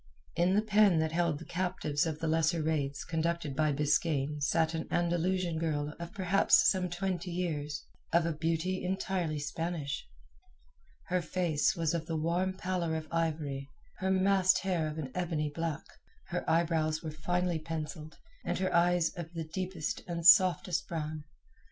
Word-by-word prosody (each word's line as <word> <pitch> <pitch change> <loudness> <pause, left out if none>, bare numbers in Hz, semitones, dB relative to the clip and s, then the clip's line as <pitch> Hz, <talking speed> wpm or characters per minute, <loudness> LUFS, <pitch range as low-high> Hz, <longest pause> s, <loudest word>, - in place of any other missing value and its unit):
In 175 +3 +3
the 210 - +3
pen 210 -4 +4
that 160 0 +1
held 170 -2 +1
the 165 - -10
captives 175 -4 -1
of 155 -2 -3
the 165 - -3
lesser 160 +1 +2
raids 145 -3 -1
conducted 165 -3 -1
by 155 +1 +2
Biskaine 150 0 0
sat 160 +3 +2
an 160 0 -3
Andalusian 175 0 0
girl 150 -2 -1
of 170 0 -6
perhaps 190 0 +4
some 185 -2 -1
twenty 180 0 -2
years, 155 -5 -3 0.3
of 170 0 +3
a 165 - 0
beauty 165 +4 -1
entirely 185 -4 -1
Spanish. 145 - -3 1.0
Her 180 0 0
face 170 -3 +1
was 165 -2 0
of 165 -1 -2
the 165 - -2
warm 175 +4 0
pallor 180 -3 -1
of 155 -1 -4
ivory, 150 -4 -1 0.3
her 190 - 0
massed 190 0 +4
hair 175 -5 0
of 155 0 -5
an 140 -5 -4
ebony 160 -4 -1
black, 165 -1 -3 0.5
her - - -2
eyebrows 160 -1 +1
were 155 - -4
finely 175 +2 -1
pencilled, 155 0 -6 0.3
and - - -1
her 185 0 -1
eyes 175 -1 +3
of 170 -2 -6 0.2
deepest 185 +2 -3
and 170 -1 -4
softest 185 -3 +6
brown. 155 -2 -4
165 Hz, 160 wpm, -31 LUFS, 155-180 Hz, 1.0 s, softest